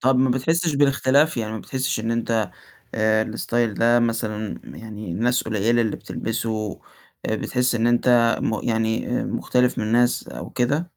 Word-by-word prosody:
طَب 130 +1 +3
ما 130 0 +3
بتحسّش 160 +5 +1
بالاختلاف 140 +1 +3
يعني 110 -1 -2
ما 110 - -4
بتحسّش 130 -2 -2
إن 115 +1 -2
أنت 115 -3 0 0.4
آآ، 110 0 +2
الstyle 115 -1 -1
ده 120 +1 +4
مثلًا 110 -2 -2
يعني 105 -5 -8
ناس 120 +5 +1
قليلة 110 +2 +1
اللي 110 - -2
بتلبسُه، 110 -3 -4 0.5
آآ، - - 0
بتحِسّ 125 -1 0
إن 115 0 +1
أنت 120 -1 +3
م 110 - 0
يعني 110 +2 0
آآ، - - -3
مختلف 125 0 0
من 110 +1 -1
ناس 120 +1 +2
أو - - -8
كده؟ 140 +7 0
115 Hz, 165 wpm, -23 LUFS, 110-125 Hz, 0.5 s, ده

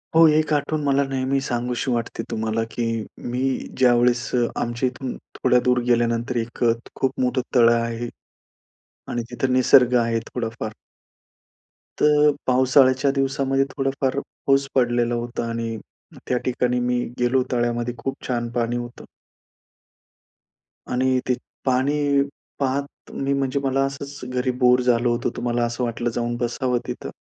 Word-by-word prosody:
हो, 165 0 +8
एक 155 0 +2
आठवून 150 +1 0
मला 140 0 +2
नेहमी 135 0 0
सांगूशी 125 0 -2
वाटते 115 -1 -2
तुम्हाला, 110 +1 -1
की 120 - -3 0.5
मी 125 +1 -2 0.4
ज्यावेळेस 120 -1 +3 0.3
आमच्या 120 +2 -1
इथून 130 0 -6 0.2
थोड्या 125 - +3
दूर 125 0 +3
गेल्यानंतर, 120 +1 +1
एक 115 +1 -3
अ, 115 - +5 0.2
खूप 135 -1 -1
मोठं 125 0 +1
तळ 115 -1 +7
आहे. 115 0 -2 1.0
आणि 120 - -2
तिथं 125 +1 -1
निसर्ग 125 0 +5
आहे, 115 0 0
थोडाफार. 115 -2 -4 1.3
तर 150 0 +5 0.2
पावसाळ्याच्या 130 +1 +4
दिवसामध्ये, 135 0 +1
थोडाफार 135 0 0
पाऊस 135 0 0
पडलेला 120 -1 +2
होता. 120 0 -3
आणि 115 -1 -3 0.5
त्या 125 - +1
ठिकाणी 125 -1 +1
मी 125 0 0 0.2
गेलो, 125 +1 +2
तळ्यामध्ये 120 0 0
खूप 135 +3 -3
छान 120 -2 -1
पाणी 120 0 0
होतं. 120 0 -7 1.9
आणि 130 +1 +2
ते 125 - +3 0.3
पाणी 140 +2 +2 0.4
पाहत 140 +1 -3
मी 140 0 -1
म्हणजे 140 0 0
मला 135 0 +1
असंच 140 +1 -6
घरी 125 0 0
बोर 125 0 +5
झालो 120 -1 +2
होतो, 120 - -1
तर - - -8
मला 120 0 0
असं 120 +1 -3
वाटलं, 120 0 -1
जाऊन 120 +1 -2
बसावं 120 +1 -1
तिथं. - - -5
125 Hz, 140 wpm, -23 LUFS, 120-135 Hz, 1.9 s, हो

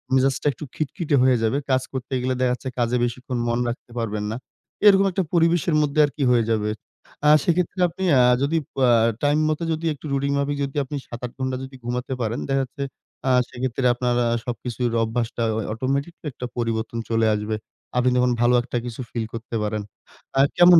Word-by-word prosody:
মেজাজটা 135 +2 +2
একটু 135 - -10
খিটখিটে 155 0 -1
হয়ে 130 -2 +5
যাবে। 115 +5 +2
কাজ 130 0 +3
করতে 130 0 -5
গেলে 130 +1 0
দেখা 125 -1 +3
যাচ্ছে 130 +1 -5
কাজে 120 +1 +2
বেশিক্ষণ 125 +1 -3
মন 120 0 +1
রাখতে 120 0 -7
পারবেন 105 -2 -2
না। - - -3 0.5
এরকম 195 -1 +7
একটা 190 +1 0
পরিবেশের 170 -1 +3
মধ্যে 150 0 0
আরকি 145 0 -3
হয়ে 120 -2 +4
যাবে। 105 -1 +1 0.6
আ - - +7
সেক্ষেত্রে 180 +2 0
আপনি 185 +3 -6 0.2
আ - - +7 0.2
যদি 155 +4 +1 0.2
পা 130 -2 +3 0.4
টাইম 145 +1 +3
মতো, 155 +2 -1
যদি 160 +1 -4
একটু 145 - -13
রুটিন 140 +1 0
মাফিক, 145 +1 0
যদি 135 - -9
আপনি 140 +2 -6
৭-৮ 120 0 -6
ঘণ্টা 130 -1 -1
যদি 135 0 -9
ঘুমাতে 125 +2 -2
পারেন 115 +1 -1
দেখা 135 0 +2
যাচ্ছে 135 +2 -6 0.4
আ - - +4 0.2
সেক্ষেত্রে 125 +1 -2
আপনারা 120 0 +1 0.2
সবকিছুর 120 -1 -2
অভ্যাসটা 115 +1 -2
অ - - 0
অটোমেটিক 140 +7 -1 0.2
একটা 125 - -6
পরিবর্তন 115 -1 -2
চলে 115 -1 +2
আসবে। 105 +1 -2 0.4
আপনি 125 +1 +4
যখন 125 0 +3
ভালো 120 +1 +4
একটা 120 0 -3
কিছু 120 +1 -5
ফিল 115 -2 -2
করতে 115 0 -6
পারেন, 105 0 -1 0.6
আ - - +5 0.2
কেমন 175 -1 +9
125 Hz, 190 wpm, -23 LUFS, 120-140 Hz, 0.6 s, কেমন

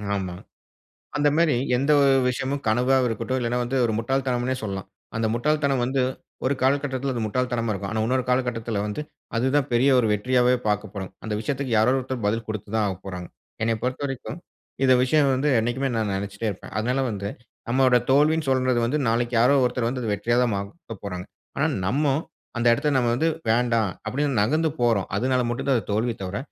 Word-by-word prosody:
ஆமா. 95 -2 -3 0.8
அந்த 145 0 +3
மாரி 165 -4 +3 0.2
எந்த 140 +4 0
ஒரு 140 -1 +5 0.2
விஷயமும் 135 +3 -3
கனவா 125 +5 +3
இருக்கட்டும். 120 +3 -2
இல்லைனா 120 +1 0
வந்து 125 +3 -2
ஒரு 115 - +1
முட்டாள் 130 +3 0
தனம்னே 125 0 0
சொல்லலாம். 95 -2 -4 0.3
அந்த 115 0 +1
முட்டாள் 150 +6 +1
தனம் 135 -2 +2
வந்து, 130 +1 0 0.4
ஒரு 130 +2 +2
காலகட்டத்தில 135 -1 +1
அது 120 - -2
முட்டாள் 125 +4 -1
தனமா 115 -2 0
இருக்கும். 100 -1 -4
ஆனா, 110 - -1
இன்னொரு 130 +1 +1
காலகட்டத்தில 120 -4 0
வந்து 105 +6 -4 0.4
அது 120 +3 +1
தான் 145 -1 +1
பெரிய 120 +3 +4
ஒரு 120 - +3
வெற்றியாவே 125 +3 +3
பார்க்கப்போறோம். 105 -2 -2
அந்த 110 -1 -2
விஷயத்திற்கு 135 +2 -3
யாரோ 110 +4 +4
ஒருத்தர் 130 -3 -4
பதில் 115 +2 0
கொடுத்து 110 -2 -5
தான் 110 -1 +2
ஆகப்போகிறார்கள். 90 -1 -7 0.3
"என்னை 115 0 +2
பொறுத்தவரைக்கும் 135 +3 -3 0.5
இந்த 130 - +6
விஷயம் 140 +2 +3
வந்து 135 +3 0
என்னிக்குமே 120 +4 0
நான் 110 -3 0
நினைச்சுட்டே 100 +3 -3
இருப்பேன். 95 - -9
அதனால 125 +5 0
வந்து, 100 -2 -4 0.4
நம்முடைய 125 0 +4
தோல்வின்னு 150 +2 +3
சொல்றது 130 -2 +2
வந்து 140 +6 0
நாளைக்கு 120 +1 0
யாரோ 125 +4 +5
ஒருத்தர் 125 -1 0
வந்து 120 -3 -2
வெற்றியா 110 +4 0
தான் 120 -3 +1
மாத 115 +5 -7
போறாங்க." 90 -2 -5 0.3
ஆனா, - - +3 0.2
நம்ம 140 +10 +1 0.5
அந்த 120 - 0
இடத்தில 145 +4 +1
நம்ம 120 -2 +2
வந்து 150 +7 +1 0.2
வேண்டாம் 115 -3 +2 0.2
அப்டின்னு 140 -2 0
நகர்ந்து 155 +9 +2
போறோம். 115 -5 +2
அதனால 125 +3 +1
மட்டும் 120 +3 -3
தான் 135 - +4
அது 110 - -6
தோல்வி 115 +3 0
தவிர 95 +1 -3
120 Hz, 185 wpm, -24 LUFS, 110-135 Hz, 0.8 s, இந்த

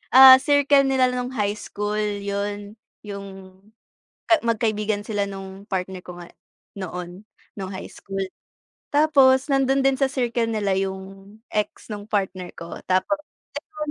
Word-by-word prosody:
ah, 260 0 +12
circle 285 -1 +4
nila 265 -1 +3
nung 250 0 -3
high 210 -4 -1
school 210 0 -4 0.2
yun, 205 +1 -4 0.3
yung 200 -1 -7 1.0
ka 335 - +7
magkaibigan 215 -2 0
sila 205 -2 -1
nung 195 0 -8
partner 190 -1 -3
ko 180 - -9
nga 175 - -10 0.5
noon, 180 +1 -7 0.3
nung 195 -1 -5
high 190 - -7
school 195 0 -5 0.7
.Tapos 280 -3 +5
nandun 270 0 +3
din 270 -1 +2
sa 275 - +3
circle 240 -3 0
nila 210 -3 0
yung 195 +1 -6 0.2
ex 210 -1 -2
nung 205 -1 -6
partner 190 -4 -2
ko. 170 0 -8
Tapos, 185 +12 +1 0.4
alam 305 0 -7
210 Hz, 140 wpm, -23 LUFS, 195-260 Hz, 1.0 s, ah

